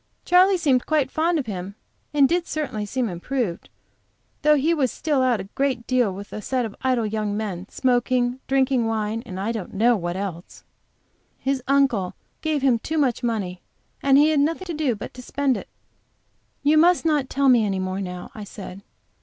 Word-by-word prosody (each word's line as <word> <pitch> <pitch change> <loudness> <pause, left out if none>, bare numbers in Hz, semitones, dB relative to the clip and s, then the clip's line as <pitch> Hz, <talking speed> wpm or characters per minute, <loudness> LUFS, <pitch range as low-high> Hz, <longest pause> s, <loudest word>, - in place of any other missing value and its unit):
Charley 370 +2 +5
seemed 270 -7 +1
quite 300 -4 +1
fond 330 +2 +1
of 285 - -2
him, 195 -2 -6 0.4
and 285 -2 +5
did 345 +2 0
certainly 220 -9 -3
seem 250 +3 -1
improved, 190 +1 -3 0.7
though 300 0 +5
he 300 +4 +2
was 270 -7 +1
still 295 -4 0
out 250 -4 +2
a - - -4
great 250 +4 -2
deal 250 -5 +2
with 200 +2 -9
a 215 - -5
set 250 +3 -1
of 215 - -7
idle 255 -3 +1
young 210 -1 -2
men, 195 -3 -4
smoking, 250 0 +1
drinking 265 -3 +2
wine, 220 0 -1
and, 185 0 -6
I 205 +4 -1
don't 215 -4 -6
know 235 +4 +4
what 175 -3 -3
else. 185 -3 -6 0.7
His 270 0 -1
uncle 265 -9 +2 0.3
gave 310 -3 -1
him 250 -4 +3
too 315 +7 -3
much 260 -6 +1
money, 200 -7 -2 0.4
and 275 0 +5
he 295 +2 +6
had 305 - +2
nothing 325 +6 0
to 345 - -4
do 295 -6 0
but 205 - -8
to 250 - -10
spend 275 +1 0
it." - - -7 0.9
"You 305 +2 +5
must 350 +1 +4
not 295 -5 +1
tell 275 0 +1
me 245 -4 +6
any 195 -2 0
more 185 +1 -2
now," 180 -1 -6
I 215 - -7
said. 195 -1 -9
250 Hz, 195 wpm, -23 LUFS, 205-285 Hz, 0.9 s, he